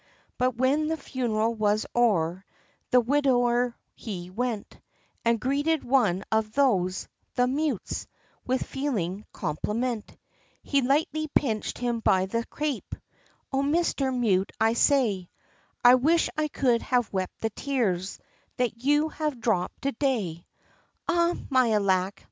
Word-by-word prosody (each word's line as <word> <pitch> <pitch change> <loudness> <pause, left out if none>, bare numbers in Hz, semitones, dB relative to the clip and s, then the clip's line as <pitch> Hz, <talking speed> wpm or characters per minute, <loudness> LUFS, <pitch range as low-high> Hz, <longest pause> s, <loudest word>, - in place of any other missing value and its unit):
But 255 -1 +1
when 275 +5 +2
the 320 +1 -1
funeral 230 -5 -1
was 215 -1 +1
o'er, 190 -7 +2 0.5
The 250 - +6
widower 245 -2 +2 0.2
he 180 -5 -7
went 230 0 -3 0.4
And 230 -1 +2
greeted 285 +6 0
one 215 -8 +2
of 220 -1 +1
those 195 -10 +1 0.3
the 245 - +3
mutes 275 - -2 0.4
With 255 +1 -1
feeling 210 -9 -3
compliment, 215 +8 -3 0.5
He 280 -1 +2
lightly 300 +4 +1
pinched 230 -7 -1
him 240 -1 -1
by 190 -4 +3
the 230 +5 -2
crape 295 -3 -3 0.6
"O 270 - +2
Mister 285 -2 +1
Mute, 210 -7 +1
I 225 +1 +3
say, 230 - +2 0.6
I 245 - +10
wish 310 +7 +3
I 310 0 0
could 250 -5 +1
have 245 -5 0
wept 185 -1 -3
the 225 - -1
tears, 205 -8 -1 0.4
That 245 -2 -1
you 295 +3 +3
have 300 -5 -3
dropped 215 -6 -1
to 275 - +1
day!" 220 - -2 0.6
"Ah! 345 0 +2 0.2
me 255 -4 +4
alack!" 190 -1 +1
245 Hz, 130 wpm, -27 LUFS, 210-275 Hz, 0.6 s, I